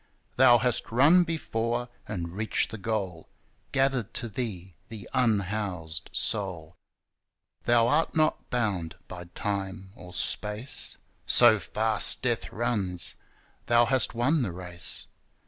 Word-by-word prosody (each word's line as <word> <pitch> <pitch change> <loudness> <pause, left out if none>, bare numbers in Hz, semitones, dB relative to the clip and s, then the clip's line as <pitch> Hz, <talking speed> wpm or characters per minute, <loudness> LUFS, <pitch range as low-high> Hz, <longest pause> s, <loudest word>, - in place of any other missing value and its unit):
Thou 120 -2 +6
hast 120 0 0
run 150 +10 +5
before 120 -8 -3 0.2
and 85 -5 -5
reached 110 +1 0
the 110 - -7
goal, 95 -5 -4 0.4
Gathered 135 -5 0
to 120 - -3
Thee 95 -6 -6 0.2
the 110 -3 -9
unhoused 100 -8 -1
soul. 90 -6 -1 0.9
Thou 120 -1 +4
art 150 +6 +1
not 155 -1 0
bound 100 -10 -2
by 90 -1 -9
Time 95 -1 -4
or 90 0 -12
Space: 105 +7 -1 0.3
So - - +7
fast - - +2
Death - - -1
runs: 100 -6 -1 0.5
Thou 120 0 +4
hast 130 0 0
won 135 +6 +1
the 100 - -2
race. 90 -1 0
110 Hz, 120 wpm, -27 LUFS, 95-120 Hz, 0.9 s, So